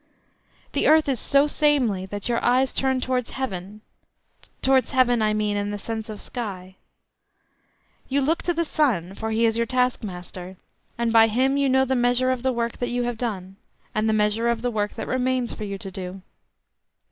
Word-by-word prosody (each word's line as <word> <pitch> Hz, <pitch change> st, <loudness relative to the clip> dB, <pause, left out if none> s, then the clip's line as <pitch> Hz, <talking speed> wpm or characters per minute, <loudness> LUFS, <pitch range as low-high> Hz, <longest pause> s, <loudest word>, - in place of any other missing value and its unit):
The -, -, +1 dB
earth 315 Hz, 0 st, +5 dB
is 265 Hz, -4 st, 0 dB
so 280 Hz, 0 st, +3 dB
samely 270 Hz, -11 st, +1 dB
that 205 Hz, +2 st, -5 dB
your 235 Hz, -1 st, 0 dB
eyes 255 Hz, +2 st, +3 dB
turn 265 Hz, -1 st, 0 dB
towards 250 Hz, -1 st, -1 dB
heaven—towards 215 Hz, +4 st, -3 dB
heaven, 245 Hz, -3 st, +3 dB
I 215 Hz, 0 st, +2 dB
mean, 210 Hz, -1 st, 0 dB
in 205 Hz, 0 st, -1 dB
the 205 Hz, -, -3 dB
sense 220 Hz, +1 st, -5 dB
of 210 Hz, -1 st, -6 dB
sky. 190 Hz, -6 st, -6 dB, 1.3 s
You 280 Hz, +1 st, +1 dB
look 315 Hz, +5 st, +1 dB
to 350 Hz, -, 0 dB
the 335 Hz, +1 st, 0 dB
sun, 220 Hz, -, 0 dB
for 220 Hz, +2 st, -4 dB
he 225 Hz, +1 st, +2 dB
is 225 Hz, 0 st, +2 dB
your 235 Hz, 0 st, 0 dB
task 250 Hz, 0 st, +1 dB
master, 180 Hz, -1 st, -8 dB, 0.4 s
and 235 Hz, -1 st, 0 dB
by 225 Hz, 0 st, +7 dB
him 260 Hz, +5 st, +1 dB
you 280 Hz, -1 st, +2 dB
know 265 Hz, 0 st, +4 dB
the 265 Hz, 0 st, 0 dB
measure 245 Hz, +1 st, +2 dB
of 255 Hz, -2 st, -2 dB
the 260 Hz, +1 st, +1 dB
work 235 Hz, -1 st, -2 dB
that 245 Hz, -, -1 dB
you 245 Hz, 0 st, -1 dB
have 240 Hz, -2 st, -3 dB
done, 195 Hz, -5 st, -4 dB, 0.4 s
and 215 Hz, +1 st, +1 dB
the -, -, +2 dB
measure 215 Hz, +2 st, +1 dB
of 235 Hz, 0 st, 0 dB
the 245 Hz, -, 0 dB
work 210 Hz, -2 st, -2 dB
that -, -, -5 dB
remains 255 Hz, -1 st, 0 dB
for 215 Hz, -, -6 dB
you 200 Hz, -1 st, -4 dB
to 195 Hz, 0 st, -8 dB
do. 185 Hz, 0 st, -7 dB
235 Hz, 195 wpm, -24 LUFS, 210-255 Hz, 1.3 s, by